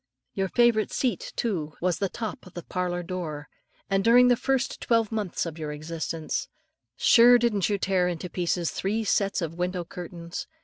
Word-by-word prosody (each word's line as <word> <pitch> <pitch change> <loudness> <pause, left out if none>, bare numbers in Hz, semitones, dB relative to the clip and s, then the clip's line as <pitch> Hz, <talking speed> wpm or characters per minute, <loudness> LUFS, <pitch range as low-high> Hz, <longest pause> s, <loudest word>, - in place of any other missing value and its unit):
Your 195 -1 -1
favourite 235 -2 +3
seat, 255 -3 -1
too, 165 -10 -2
was 180 -1 0
the 195 - 0
top 220 -3 -6
of 185 - -16
the 175 - -6
parlour 180 -1 -2
door; 165 -5 -5 0.4
and 195 -1 +1
during 245 +3 +6
the 245 - +5
first 265 +1 -1
twelve 230 -2 +2
months 210 -7 -2
of 165 -1 -6
your 150 -1 -4
existence, 160 +1 -4 0.5
sure 245 +1 +7
didn't 220 -5 +1
you 205 - +1
tear 185 -2 +1
to 170 - -6
pieces 175 -1 -1
three 215 +4 -1
sets 200 -3 +1
of 165 +1 -5
window 180 0 -2
curtains? 175 +7 -7
185 Hz, 175 wpm, -26 LUFS, 170-220 Hz, 0.5 s, sure